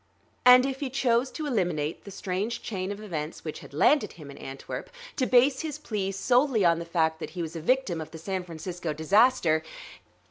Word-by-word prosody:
And 250 +1 +9
if 270 -1 -3
he 280 - -2
chose 255 -1 +1
to 310 - -5
eliminate 175 - -1
the - - -8
strange 195 +3 -3
chain 190 -2 -3
of 205 - -6
events 160 -6 -5
which 155 - -5
had - - -13
landed 275 - +3
him 150 -4 -11
in - - -12
Antwerp, 135 0 -7 0.3
to 255 - +1
base 260 +2 +4
his 305 -2 -4
plea 210 -10 -3
solely 245 +2 +2
on 170 -1 +4
the 170 - -5
fact 160 -2 0
that - - -5
he 175 - -1
was 160 +1 -6
a 165 - -4
victim 195 -4 +1
of 155 - -7
the 165 - -9
San 185 +3 -3
Francisco 170 -1 -5
disaster 165 0 +3
190 Hz, 205 wpm, -27 LUFS, 165-250 Hz, 0.3 s, And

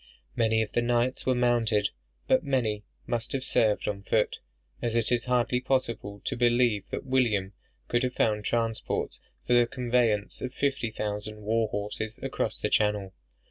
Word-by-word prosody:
Many 110 -1 +3
of 105 - -7
the 120 - +1
knights 120 +2 0
were 130 - +3
mounted, 115 -4 +2 0.4
but - - +4
many 115 -7 0 0.2
must 120 -1 -2
have 135 -1 -1
served 110 -5 +2
on 100 -1 -2
foot; 105 +1 +1 0.4
as 120 -1 -1
it 115 0 +2
is 120 -1 +1
hardly 125 0 +1
possible 115 -6 -1
to - - -1
believe 120 -4 +2
that - - -4
William 115 -7 +1 0.3
could 120 - +1
have 125 -1 -1
found 105 -2 +1
transports 115 0 -1 0.3
for 125 - +2
the 120 -1 +5
conveyance 120 -4 0
of 130 +1 -5
fifty 135 -4 0
thousand 105 0 -4
war 110 +1 +1
horses 105 +2 -4
across - - -2
the - - 0
Channel. 105 -3 +1
115 Hz, 165 wpm, -28 LUFS, 105-125 Hz, 0.4 s, the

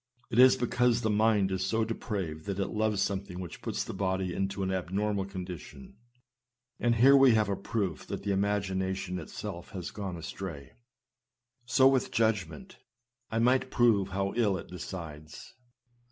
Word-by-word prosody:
It 115 - +1
is 130 0 +8
because 125 -1 +1
the 110 - +1
mind 105 -2 +3
is 95 0 -1
so 110 +2 +1
depraved 95 -8 -4
that 100 -1 -3
it 100 - -1
loves 105 -2 +1
something 95 -2 -3
which 90 -3 -8
puts - - -2
the - - -7
body 95 -1 -1
into 95 +1 -2
an 95 - -1
abnormal 95 +2 -1
condition; 90 -5 -8 0.8
and 120 -1 +2
here 135 +5 +7
we 135 -4 +7
have 105 -2 +2
a 100 - 0
proof 100 0 -3
that - - -5
the 100 - -1
imagination 95 -2 -1
itself 85 +1 -7
has 90 -3 -5
gone 95 -4 -5
astray. 85 -3 -7 1.0
So 130 +2 +5
with 135 -1 +3
the - - -12
judgment 105 -9 -1 0.3
— 120 +1 -59 0.2
I 110 - -1
might 130 +3 +3
prove 110 -7 +3
how 100 +1 -2
ill 105 -5 +2
it - - -9
decides. 80 -4 -8
100 Hz, 170 wpm, -30 LUFS, 95-110 Hz, 1.0 s, is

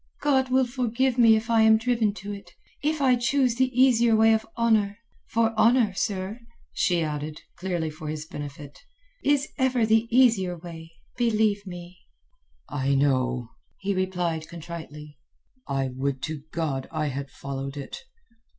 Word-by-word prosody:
"God 265 -3 +2
will 260 0 +3
forgive 250 0 0
me 225 -2 +7
if 220 +1 -2
I 225 -1 +5
am 220 0 +6
driven 230 -2 +1
to 205 +1 -6
it—if 290 +9 -5
I 255 -2 +5
choose 245 +1 +2
the 260 0 +3
easier 240 -3 +5
way 225 +1 +5
of 220 0 -1
honour; 215 -3 +2 0.3
for 225 0 +1
honour, 230 -2 +4
sir," 195 +3 -3 0.3
she 175 -2 +1
added, 150 0 -4 0.2
clearly 170 -3 -2
for 155 0 -9
his 155 0 -4
benefit, 145 -2 -8 0.4
"is 285 0 +2
ever 255 -3 +2
the 225 +1 +3
easier 225 -8 +3
way, 165 -1 -10 0.3
believe 215 -4 +1
me." 175 0 -9 0.7
"I 140 -1 0
know," 130 -3 +1 0.3
he 200 +1 -2
replied 175 -4 -2
contritely. 155 -4 -9 0.5
"I 135 -1 -1
would 135 +1 -3
to 155 -2 -5
God 150 -5 -2
I 155 -2 -1
had 140 +1 -5
followed 135 +1 -6
it." 140 - -7
190 Hz, 150 wpm, -26 LUFS, 150-230 Hz, 0.7 s, me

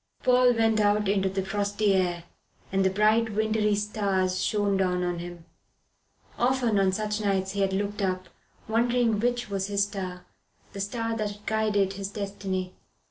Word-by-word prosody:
Paul 250 -1 +5
went 225 -1 +2
out 210 0 +2
into 195 -1 +2
the 190 0 -2
frosty 205 +1 0
air, 175 -2 0 0.5
and 195 0 +2
the 190 - +4
bright 215 +3 +2
wintry 215 0 +1
stars 200 -3 0
shone 205 -2 +1
down 180 -1 +1
on 175 -1 -2
him. 175 -1 -8 0.9
Often 245 -4 +2
on 190 -1 +3
such 210 +2 -2
nights 190 -2 0
he 200 0 -2
had 195 -1 +2
looked 205 +2 -2
up, 185 -1 -1 0.4
wondering 235 -1 +2
which 245 +1 0
was 195 -1 -1
his 200 0 +1
star, 185 -3 -5 0.5
the 200 - -5
star 225 +3 -2
that 210 -1 -4
guided 210 -3 +1
his 195 0 -5
destiny. 195 -2 -4
205 Hz, 160 wpm, -27 LUFS, 190-215 Hz, 0.9 s, Paul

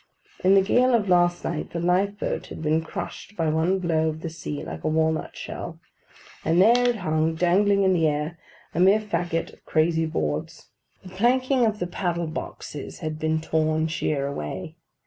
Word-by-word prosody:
In 190 +2 +6
the 195 - +6
gale 245 +5 +4
of 205 -4 0
last 175 -1 +3
night 165 -2 -3
the 170 - -2
life 185 +4 +1
boat - - -3
had - - -8
been 155 +1 +2
crushed 175 +5 -7
by 165 -2 +1
one 160 +5 +2
blow 160 -3 +1
of 155 0 -6
the 165 - -5
sea 155 -3 -5
like - - -7
a - - -1
walnut 160 0 0
shell; - - -7 0.6
and 165 +2 +2
there 240 +5 +5
it 240 - +1
hung 160 -4 0
dangling 195 +4 +3
in 190 -1 +4
the 165 -3 +3
air: 150 +3 -2 0.3
a 165 - -2
mere 195 +4 +6
faggot 175 -6 -2
of - - -20
crazy 160 0 +2
boards. 75 - -3 0.3
The 185 - -10
planking 245 +5 +2
of 215 -1 -1
the 175 - -2
paddle 175 -1 -2
boxes 155 -2 -7
had 155 -1 -4
been 155 0 0
torn 155 0 +1
sheer 150 -3 -1
away. 95 - -5
170 Hz, 185 wpm, -25 LUFS, 155-195 Hz, 0.6 s, In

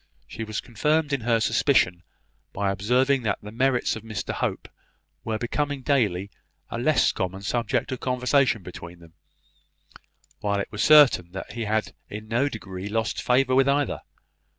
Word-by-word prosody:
She 115 - -7
was 110 -1 -4
confirmed 150 +6 0
in 135 - 0
her 115 0 +2
suspicion 110 -6 +2 0.5
by 100 0 0
observing 125 +7 +2
that 105 -4 -1
the 105 - -8
merits 125 +2 +1
of 110 - -7
Mr 110 -3 -5
Hope - - -3 0.6
were 110 -1 -2
becoming 140 +4 -2
daily 105 -9 +1 0.4
a 115 - -3
less 155 +5 +3
common 95 +1 -4
subject 115 +3 -1
of 130 - -3
conversation 125 -3 +1
between 85 0 -9
them, 85 -1 -17 1.3
while 100 -1 0
it - - -4
was 105 - -3
certain 135 - +6
that 95 - -7
he 115 -1 -4
had 110 +1 -1 0.2
in 105 +1 -7
no 120 +6 +1
degree 95 -5 -7
lost 110 0 -1
favour 130 +1 +2
with 135 +1 +4
either. 145 0 0
115 Hz, 160 wpm, -25 LUFS, 100-130 Hz, 1.3 s, certain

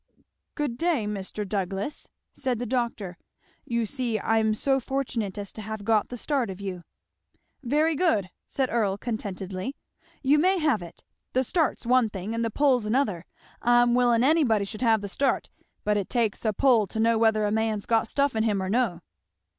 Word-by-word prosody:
"Good 285 -6 -2
day, 330 -10 +1
Mr. 205 0 -4
Douglass!" 195 +6 -3 0.3
said 255 -3 -2
the 245 - -3
doctor. 230 -7 -2 0.5
"You 235 -1 0
see 235 -2 -2
I'm 220 0 +2
so 270 +4 +1
fortunate 245 -7 -3
as 200 -1 -5
to 220 - -7
have 215 -1 -6
got 220 -2 +2
the 245 - -6
start 270 -2 -1
of 190 0 -7
you." 190 -3 -5 0.8
"Very 300 +5 +2
good," 220 - +1 0.2
said 265 -2 -1
Earl 205 -4 +1
contentedly, 200 0 -4 0.5
"you 285 +3 +4
may 375 +4 +3
have 300 - +1
it; 170 -1 -11 0.3
the 260 - +2
start's 315 -1 0
one 250 -2 +4
thing 200 +2 -5
and 230 0 -1
the 230 - 0
pull's 255 -2 +2
another. 215 -7 0 0.4
I'm 240 0 +4
willin' 240 -1 +3
anybody 260 -9 +3
should 215 +3 -7
have 225 -4 +3
the 200 - -4
start, 270 +7 0 0.3
but 210 0 +1
it 200 - -2
takes 230 -4 0
a 220 - +3
pull 230 -2 +3
to 220 - -5
know 225 0 +3
whether 220 -2 +3
a 205 - 0
man's 220 -1 0
got 225 -1 +2
stuff 280 +1 +1
in 220 - +1
him 215 -3 +1
or 190 - -3
no." 210 -6 0
225 Hz, 185 wpm, -26 LUFS, 205-255 Hz, 0.8 s, you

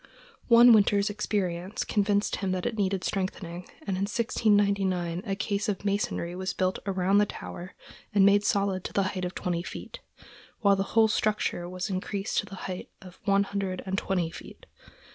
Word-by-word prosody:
One 235 0 +8
winter's 205 -1 +4
experience 195 -1 -2
convinced 205 -1 +1
him 190 -2 -1
that 185 -1 -3
it 240 - -1
needed 195 -3 0
strengthening, 180 -3 -3 0.2
and - - -6
in 190 +2 0
1699 200 -6 +1
a 195 - 0
case 200 0 -1
of 200 0 -3
masonry 200 -4 -1
was 185 +1 -3
built 185 0 0
about 190 +1 +2
the 210 - +3
tower, 180 -1 -8 0.4
and 200 -2 +5
made 200 +1 +5
solid 195 -2 +1
to - - -5
the 200 - +2
height 185 -2 -3
of 180 - -5
twenty 175 -2 -2
feet, - - -8 0.6
while 200 -2 +5
the 195 - -1 0.2
whole 220 -1 +7
structure 210 -5 0
was 185 +2 -4
increased 195 +1 -2
to - - -4
the 195 - -8
height 185 -1 -5
of 185 -2 -14
one 200 0 +4
hundred 200 -2 -3
and 190 0 -2
twenty 180 -4 -1
feet. - - -12
195 Hz, 180 wpm, -28 LUFS, 185-205 Hz, 0.6 s, One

